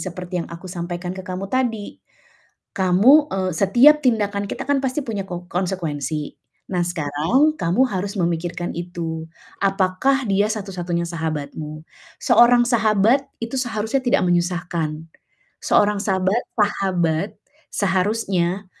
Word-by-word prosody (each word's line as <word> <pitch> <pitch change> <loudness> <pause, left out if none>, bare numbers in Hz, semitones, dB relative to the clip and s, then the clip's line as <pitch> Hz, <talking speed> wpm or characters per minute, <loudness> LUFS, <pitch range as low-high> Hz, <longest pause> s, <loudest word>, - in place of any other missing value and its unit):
seperti 180 0 -4
yang - - -7
aku 170 +2 -10
sampaikan 175 0 -5
ke 190 - -7
kamu 185 0 -5
tadi. 240 -5 -2 0.7
Kamu, 215 +12 +5
eee, 185 -1 -1
setiap 240 - +5
tindakan 205 -3 +1
kita 255 +6 -5
kan 285 0 +1
pasti 265 +2 -1
punya 210 -6 -4
ko 175 -1 -6
konsekuensi. 160 -6 -3 0.3
Nah, 175 -2 0
sekarang 175 - +1
kamu 175 +9 +2
harus 195 +1 -3
memikirkan 175 -1 -2
itu. 165 -2 -5 0.3
Apakah 195 +8 +1
dia 200 +1 +3
satu-satunya 185 -5 -3
sahabatmu? 155 -2 -5 0.4
Seorang 240 0 +6
sahabat 230 +2 +3 0.2
itu 235 +3 -3
seharusnya 225 0 -1
tidak 255 +2 +2
menyusahkan. 175 -2 0 0.7
Seorang 205 -1 +2
sabat 190 +3 +1 0.2
sahabat 190 -4 +1 0.4
seharusnya, 190 -1 0
190 Hz, 120 wpm, -21 LUFS, 175-220 Hz, 0.7 s, Seorang